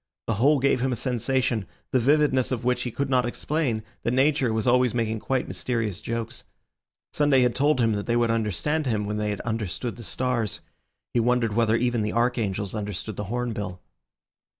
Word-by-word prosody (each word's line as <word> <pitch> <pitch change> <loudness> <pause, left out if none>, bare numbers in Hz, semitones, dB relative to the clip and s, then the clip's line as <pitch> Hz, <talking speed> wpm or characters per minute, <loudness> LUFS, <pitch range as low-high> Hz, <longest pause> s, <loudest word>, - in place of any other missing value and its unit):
The 115 - 0
whole 140 +8 +4
gave 135 -2 +2
him 130 0 +1
a - - 0
sensation, 125 -2 0 0.2
the 130 - +3
vividness 135 0 +3
of 120 -2 -2
which 125 0 +1
he 125 - -2
could 140 +4 -2
not 130 -2 +3
explain, 125 -3 -1 0.2
that 120 - 0
Nature 135 -2 +3
was 110 0 -1
always 125 -1 +3
making 110 -2 0
quite 130 +3 -1
mysterious 110 -6 -2
jokes. 115 0 -4 0.7
Sunday 145 -3 +4
had 125 -1 +3
told 145 +2 +2
them 115 -3 +2
that 100 -1 -3
they 120 - +1
would 120 -1 +2
understand 115 - 0
him 110 -4 0
when 105 +1 -2
they 105 0 -1
had 105 - -3
understood 115 +1 -3
the 120 - -9
stars. 120 -4 -1 0.5
He 120 - +3
wondered 120 -2 +2
whether 115 0 +3
even 120 -1 +1
the 105 0 -1
archangels 110 -5 0
understood 105 -1 -4
the 105 - -4
hornbill. 105 -4 -3
120 Hz, 190 wpm, -25 LUFS, 110-130 Hz, 0.7 s, whole